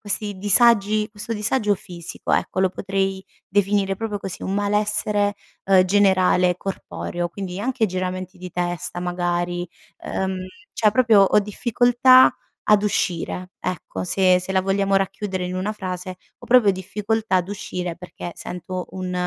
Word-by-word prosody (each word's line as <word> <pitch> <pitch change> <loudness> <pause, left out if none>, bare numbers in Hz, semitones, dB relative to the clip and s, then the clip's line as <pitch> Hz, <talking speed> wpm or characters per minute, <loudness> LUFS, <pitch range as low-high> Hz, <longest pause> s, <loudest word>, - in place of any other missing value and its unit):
questi 205 -1 -3
disagi 210 +1 +4
questo 210 +2 -6
disagio 210 0 +1
fisico 170 -2 -8
ecco, - - 0
lo 190 - +4
potrei 195 0 -2 0.2
definire 200 0 +1
proprio 215 -1 -3
così 190 -3 -6
un 190 - -2
malessere, 205 0 +1 0.3
uhm, 190 -1 +6
generale 185 -2 +3
corporeo 175 -2 -4
quindi, 185 0 -6
anche 240 +1 0
giramenti 185 0 -4
di 180 -1 -9
testa 175 0 -3
magari, 175 0 -2 0.4
ehm, 190 -1 -3 0.3
cioè, 215 - +3
proprio 225 -4 +5
ho 195 - +4
difficoltà 245 +4 +4 0.3
ad 210 -1 +4
uscire 180 -2 -2
ecco, 155 - -4
se 185 - +3
se 185 +1 -5
la 190 - +3
vogliamo 195 +1 0
racchiudere 195 -1 -1
in 180 +1 -4
una 200 +3 -2
frase 185 -3 -5 0.3
ho - - -13
proprio 240 -4 +5
difficoltà 205 +2 -2
ad 180 0 0
uscire 180 -3 -5
perché 180 -1 -8
sento 180 +1 -6
un 185 -1 -5
195 Hz, 145 wpm, -22 LUFS, 180-210 Hz, 0.4 s, uhm